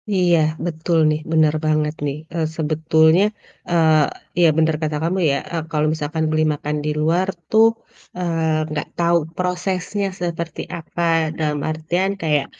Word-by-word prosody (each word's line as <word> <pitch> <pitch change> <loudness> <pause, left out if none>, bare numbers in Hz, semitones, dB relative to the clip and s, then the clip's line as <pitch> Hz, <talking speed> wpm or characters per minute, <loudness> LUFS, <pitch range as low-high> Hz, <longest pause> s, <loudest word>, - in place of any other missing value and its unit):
Iya 180 -3 +3 0.3
betul 165 0 -1
nih, 155 0 0
bener 155 -2 +4
banget 155 -1 +1
nih, 140 0 -2 0.2
eee, 165 -2 0
sebetulnya, 160 +2 +3 0.5
eee, 160 0 +2
ya 170 - +7
bener 160 -1 +3
kata 155 -1 -1
kamu 175 +3 0
ya, - - +1 0.2
eee, 170 -1 -1
kalau 150 -1 +1
misalkan 160 +1 -2
beli 155 0 +2
makan 150 0 -3
di - - 0
luar 170 +4 +2 0.2
tuh, 220 +1 +6 0.5
eee, 160 -3 -1
gak - - -3
tau 170 0 +3 0.2
prosesnya 180 +2 -2 0.2
seperti 170 -1 -3 0.2
apa 170 +1 -6 0.4
dalam 150 -2 -1
artian 170 +5 -1
kayak 150 -4 +1
160 Hz, 150 wpm, -20 LUFS, 155-175 Hz, 0.5 s, ya